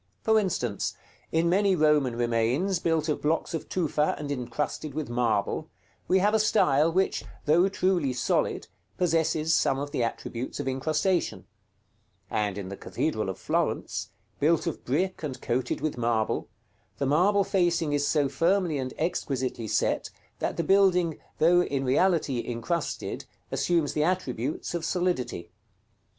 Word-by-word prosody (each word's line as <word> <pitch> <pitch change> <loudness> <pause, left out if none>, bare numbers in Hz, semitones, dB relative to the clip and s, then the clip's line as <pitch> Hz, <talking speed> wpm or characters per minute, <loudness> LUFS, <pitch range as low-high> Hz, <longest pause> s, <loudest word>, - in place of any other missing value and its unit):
For 220 0 +4
instance, 125 - -2 0.4
in 165 +1 +2
many 195 +2 +3
Roman 150 -6 +3
remains, 120 - +1
built 165 -2 0
of 150 - -1
blocks 160 +3 0
of 165 - -4
tufa 155 -4 +1
and 145 -1 -5
incrusted 140 +3 -3
with 155 -6 -3
marble, 115 -4 0 0.4
we 185 - +4
have 205 +3 +3
a 220 - +4
style, 165 -8 +3
which, 185 -9 +1 0.2
though 170 +6 +4
truly 185 -7 +1
solid, 125 - 0 0.3
possesses 160 -2 +1
some 135 - +2
of 145 +1 -4
the - - -1
attributes 115 +1 -4
of - - -3
incrustation; 155 +7 0 0.9
and 105 -2 -1
in 95 -2 -5
the 100 - -5
Cathedral - - -2
of - - -4
Florence, - - -1 0.3
built 160 +4 +2
of 170 - -4
brick 185 +9 -1
and 145 -5 -4
coated 125 +1 -1
with 155 -5 -2
marble, 115 -2 0 0.5
the 140 - -1
marble 185 +9 +3
facing 175 -6 +1
is 145 0 +1
so 145 -3 +2
firmly 165 +2 +1
and 130 -1 -4
exquisitely 130 -8 -2
set, - - 0 0.3
that - - -2
the 170 - 0
building, 180 -3 +3 0.2
though 175 +2 +5
in 140 -6 -1
reality 140 -2 +2
incrusted, 140 +8 -3 0.3
assumes 170 -4 +1
the 150 - +1
attributes 155 -7 -2
of 170 -2 -2
solidity. 170 - -1
155 Hz, 145 wpm, -27 LUFS, 130-175 Hz, 0.9 s, though